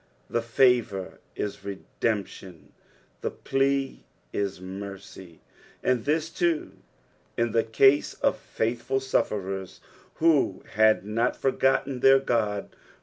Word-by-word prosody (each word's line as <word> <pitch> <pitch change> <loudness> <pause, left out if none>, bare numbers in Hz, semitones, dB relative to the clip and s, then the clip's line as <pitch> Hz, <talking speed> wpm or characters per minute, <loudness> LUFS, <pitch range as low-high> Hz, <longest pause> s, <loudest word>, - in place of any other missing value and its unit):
The 120 - +1
favour 115 -5 +1 0.2
is 100 -1 -3
redemptioi 100 -2 -4 0.5
the - - -1
plea 135 0 -1 0.3
is 100 -3 -2
mercy; 95 -2 -9 0.4
and 125 -3 +1
this, 160 +2 0
too, 170 -3 0 0.7
in 115 -1 +1
the 115 0 +2
cose 135 +5 +3
of - - 0
faithful 120 +4 -2
sufferers 95 -7 -2 0.4
who 155 - +2
had 110 -3 +4
not 115 +4 0
forgotten 135 0 +1
their 135 +1 +7
Ood. 110 -6 -1
115 Hz, 105 wpm, -26 LUFS, 100-135 Hz, 0.7 s, their